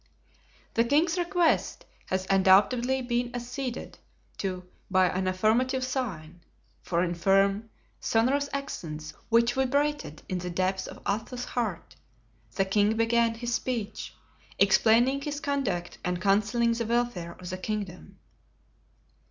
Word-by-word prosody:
The 230 - +3
king's 320 +8 +2
request 350 -1 +1 0.2
had 190 0 -1
undoubtedly 210 +7 +4
been 240 0 -1
acceded 245 +1 -5 0.4
to 185 -2 -3 0.2
by 185 -1 +4
an 185 +1 -1
affirmative 230 +8 +1
sign, 185 - -4 0.4
for 170 0 0
in 175 -1 -1
firm, 195 +4 +2 0.3
sonorous 270 +5 +1
accents, 155 - -5 0.2
which 235 +1 +4
vibrated 280 - 0
in 185 - -2
the 180 0 -4
depths 185 +2 -1
of - - -11
Athos's 225 +5 -2
heart, 215 -10 -3 0.6
the 195 - +2
king 205 +3 +2
began 230 0 +2
his 240 +1 -3
speech, 235 -4 -3 0.4
explaining 240 +5 +4
his 290 0 -3
conduct 255 -13 -2
and 180 0 -1
counseling 215 +5 +2
the 230 -1 -2
welfare 235 -8 -1
of 180 0 -9
the 185 - -3
kingdom. 200 -2 -5
225 Hz, 125 wpm, -28 LUFS, 185-250 Hz, 0.6 s, undoubtedly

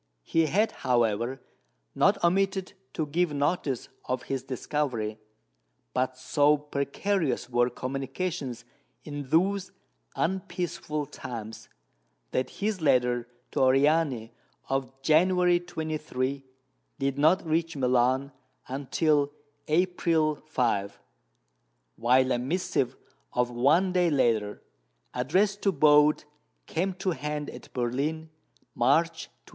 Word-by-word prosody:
He 165 - +2
had, 210 +8 +2
however, 120 +1 0 0.5
not - - +3
omitted 190 +2 +1 0.2
to 155 - -1
give 155 +1 0
notice 145 -3 -1 0.2
of 130 0 -2
his 135 -1 -3
discovery; 125 -4 -2 0.7
but 130 0 0
so 145 +3 +3
precarious 145 0 -1
were 120 0 +3
communications 135 0 -4 0.4
in 145 -3 -6
those 190 +5 +2 0.4
unpeaceful 170 -4 -2
times, 115 -5 -8 0.6
that 130 - 0
his 205 -3 -3
letter 125 -4 +2 0.2
to - - -2
Oriani 135 -2 +3 0.4
of 135 0 -2
January 180 +3 +4
23 155 -6 -3 0.5
did 135 0 -1
not 160 +5 +4
reach 165 0 0
Milan 130 +1 +2 0.4
until 145 +2 +1 0.4
April 165 -2 +2
5, 105 -9 0 1.0
while 130 +2 +3
a 120 - +1
missive 135 -2 -1 0.4
of 125 0 +1
one 155 +10 +3
day 180 -2 +3
later 115 -8 +1 0.5
addressed 190 +11 +1
to 195 - +3
Bode 150 -1 +5 0.4
came 185 +3 -1
to 190 0 -1
hand 150 0 -4
at - - -12
Berlin, 145 +6 -2 0.4
March 160 +6 +2
20. 120 - -43
145 Hz, 105 wpm, -28 LUFS, 130-165 Hz, 1.0 s, Bode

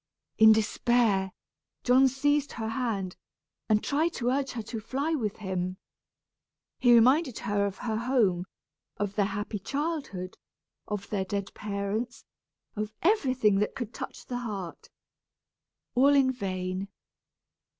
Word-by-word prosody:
In 220 0 +9
despair, 215 -2 +2 0.5
John 255 +2 +6
seized 290 +2 +1
her 220 -1 -3
hand, 225 -6 -2 0.5
and 215 -1 +3
tried 315 +4 +1
to 245 0 -1
urge 275 0 -1
her 230 -3 -4
to 225 +1 -5
fly 275 +8 -2
with 220 -9 -1
him. 185 -2 -3 1.0
He 240 -1 +6
reminded 255 +3 +4
her 200 0 0
of 195 -1 -6
her 220 -3 -2
home, 220 -8 +2 0.5
of 205 -1 -2
their 205 -1 +1
happy 205 +1 -4
childhood, 275 - -4 0.5
of 205 -2 -4
their 195 -3 0
dead 200 0 -3
parents, 210 +4 -3 0.5
of 215 0 -3
everything 255 - +3
that 210 - -1
could 240 -4 -5
touch - - -7
the 245 -1 -3
heart. 200 -8 -6 1.0
All 275 +3 +5
in 265 -2 +4
vain! 185 -4 -3
220 Hz, 130 wpm, -28 LUFS, 200-260 Hz, 1.0 s, In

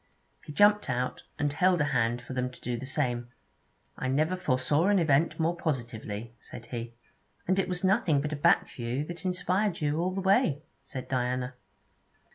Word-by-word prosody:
He - - -9
jumped 205 +6 +4
out, 125 0 -2
and 145 -1 0
held 180 +3 +3
a - - +3
hand 120 0 +1
for 130 - -7
them 125 0 -1
to 125 - -14
do 125 - -2
the 125 +3 -6
same. 125 -4 -1 0.7
'I 130 - -2
never 155 +7 +1
foresaw 150 0 +1
an 205 0 +4
event 160 -1 +2
more 165 +2 +1
positively,' 115 -7 -4
said 115 +3 -10
he. 120 -1 -6 0.5
'And 190 +2 +2
it 185 - 0
was 180 0 -3
nothing 185 -6 +3
but 150 +2 -2
a - - -1
back 145 - +4
view 125 +4 -3
that 175 +3 -8
inspired 180 +1 0
you 150 +1 0
all 185 +2 0
the - - -1
way,' 190 - +3 0.2
said 130 -3 -7
Diana. 125 0 -1
145 Hz, 185 wpm, -29 LUFS, 125-180 Hz, 0.7 s, jumped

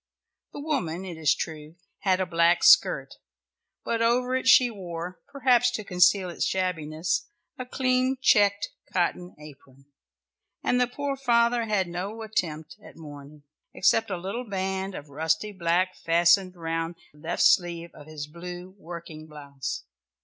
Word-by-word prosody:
The - - -8
woman, 190 - -2
it 180 -3 -6
is 155 -4 +2
true, 155 -1 -6 0.2
had 190 -2 +1
a 185 - +1
black 170 0 +2
skirt, - - +5 0.7
but 230 -1 -1
over 250 +2 +2
it 260 - -2
she 250 -2 +6
wore, 180 -3 -7
perhaps 250 -3 +3
to 215 - -3
conceal 185 0 +3
its 175 - -3
shabbiness, 170 -3 -1 0.3
a 255 - -5
clean 255 0 +1
checked 205 -5 +3 0.2
cotton 180 0 -1
apron, 140 -2 -15 0.8
and 250 0 +2
the 250 - +3
poor 280 +2 -3
father 235 -3 +2
had 205 -4 0
no 195 +6 -5
attempt 160 -8 -3
at - - -14
mourning, 145 -1 -12 0.3
except 225 +3 +2
a 185 - -2
little 205 +7 -5
band 190 0 -3
of 145 0 -9
rusty 160 +9 -1
black 185 0 0
fastened 170 +3 +3
round 165 0 -3 0.2
the 150 - -20
left 165 +3 -1
sleeve 170 -2 +2
of 150 -1 -14
his 155 -2 -6
blue 175 +3 -9
working 165 -2 -9
blouse. 145 - -6
180 Hz, 150 wpm, -26 LUFS, 165-220 Hz, 0.8 s, she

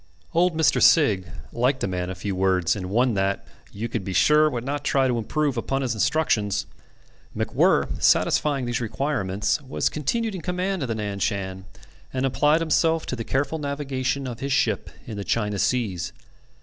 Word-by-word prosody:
Old 170 0 +2
Mr. 160 - +3
Sigg 105 - +5 0.3
liked 130 +3 +1
a - - +1
man 90 -1 -3
of 95 - -6
few 95 +1 -3
words, 95 -2 +2
and 90 -3 -5
one 120 +4 +2
that 95 0 -1 0.3
"you 110 +4 -4
could 115 -3 -3
be 95 - -4
sure 150 +8 +5
would 120 -4 -4
not 145 +2 -3
try 135 -2 +2
to 120 -2 0
improve 145 +4 -1
upon 135 +4 -1
his 125 -3 -1
instructions." 105 -5 +1 0.7
MacWhirr - - +1
satisfying 140 -4 +3
these 120 -1 -2
requirements, 115 -2 -1
was 135 -1 -1
continued 220 - -1
in 185 - -5
command 180 +1 -2
of 135 - -1
the 115 - -2
Nan 100 -2 -4
Shan, 95 -1 -2 0.5
and 130 0 -1
applied 145 +5 +2
himself 165 0 +2
to - - -3
the 115 - -4
careful 140 +6 -1
navigation 140 -2 -2
of 120 -2 -6
his 140 +1 -3
ship - - +1 0.2
in 110 -3 -7
the 100 - -3
China 105 -2 -1
seas. 95 -10 -1
125 Hz, 180 wpm, -24 LUFS, 100-145 Hz, 0.7 s, Sigg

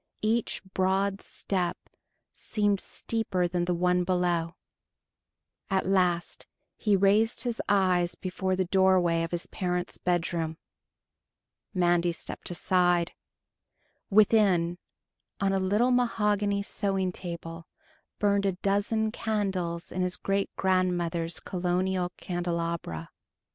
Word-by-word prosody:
Each 225 -1 0
broad 195 +1 +1
step 180 -3 -2 0.6
seemed 205 -3 0
steeper 190 -6 -1
than 175 0 -1
the 180 - 0
one 180 +1 +2
below. 175 -2 0 1.1
At 190 -1 +1
last 180 -2 0 0.3
he 210 -2 +2
raised 210 +5 +3
his 240 -2 -2
eyes 185 -3 +2
before 185 0 -2
the 185 0 0
doorway 185 -2 +3
of 165 - -2
his 175 0 -2
parents' 180 -1 -3
bedroom. 170 -2 -1 1.2
Mandy 175 -1 +3
stepped - - -7
aside. 175 -1 +2 1.0
Within, 195 -5 +4 0.6
on 195 0 +1
a 195 - +2
little 210 +7 +2
mahogany 210 -4 +1
sewing 195 -3 0
table, 170 -2 -7 0.5
burned 200 -1 +2
a 195 - +1
dozen 205 +4 0
candles 190 -7 -2
in 185 - -2
his 180 0 0
great 195 0 0
grandmother's 175 -3 0
Colonial 180 0 -1
candelabra. 170 - -3
185 Hz, 105 wpm, -28 LUFS, 175-200 Hz, 1.2 s, Within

